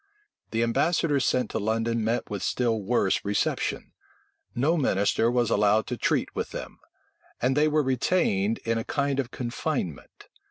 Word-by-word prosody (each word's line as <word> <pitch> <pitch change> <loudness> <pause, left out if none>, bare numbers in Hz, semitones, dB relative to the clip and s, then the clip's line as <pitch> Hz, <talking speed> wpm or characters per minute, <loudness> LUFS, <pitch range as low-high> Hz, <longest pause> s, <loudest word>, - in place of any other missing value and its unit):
The 115 +1 0
ambassadors 145 +3 +1
sent 125 -3 +1
to - - -1
London 115 +2 0
met 115 +2 -1
with 100 -3 -5
still 115 -3 0
worse 100 -1 +1
reception: 100 0 -1 0.6
no 145 +7 +2
minister 115 - +2
was 120 -2 +1
allowed 105 +1 +3
to - - -3
treat - - 0
with - - -2
them; - - -8 0.6
and 130 +2 +1
they 150 +1 +4
were 155 0 +2
retained 120 - +1
in 115 0 +1
a - - -3
kind 140 +1 -1
of 130 -4 -1
confinement. 125 - -4
120 Hz, 155 wpm, -26 LUFS, 110-135 Hz, 0.6 s, they